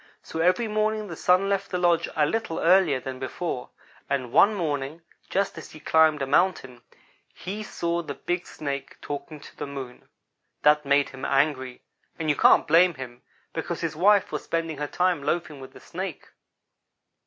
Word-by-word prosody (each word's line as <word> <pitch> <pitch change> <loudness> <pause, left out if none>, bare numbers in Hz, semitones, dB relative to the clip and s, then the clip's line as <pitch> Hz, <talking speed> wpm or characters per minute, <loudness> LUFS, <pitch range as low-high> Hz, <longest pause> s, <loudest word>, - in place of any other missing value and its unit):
So 160 - -6
every 180 +7 +3
morning 215 0 0
the 170 - -6
Sun 185 +4 +3
left 200 0 -1
the 180 - -1
lodge 175 -2 +2
a 150 - +3
little 195 0 -2
earlier 170 -6 +4
than 130 0 -7
before; 130 +1 -4 0.4
and 130 -4 -1
one 210 - +5
morning, 155 -2 -3 0.3
just 200 +1 -1
as - - -11
he 155 - -12
climbed 155 -1 +3
a - - 0
mountain, 135 -5 +1 0.5
he 200 +4 -6
saw 170 -4 -2
the 145 -4 -6
big 175 0 -3
Snake 140 -2 -5
talking 145 +1 -6
to - - -14
the - - -5
Moon. 135 -3 -8 0.5
That 150 -1 +4
made 140 0 +3
him 135 0 -11
angry, 135 -3 0 0.3
and 155 -2 0
you - - 0
can't - - +5
blame 175 +1 +5
him, 125 -2 -9 0.3
because 165 +1 -4
his 165 -2 -2
wife 200 +4 +4
was - - -3
spending 165 -3 -2
her 150 - -2
time 180 -1 +1
loafing 155 -1 -2
with 130 0 -12
a - - -11
Snake. 185 -2 -7
160 Hz, 175 wpm, -25 LUFS, 140-180 Hz, 0.5 s, one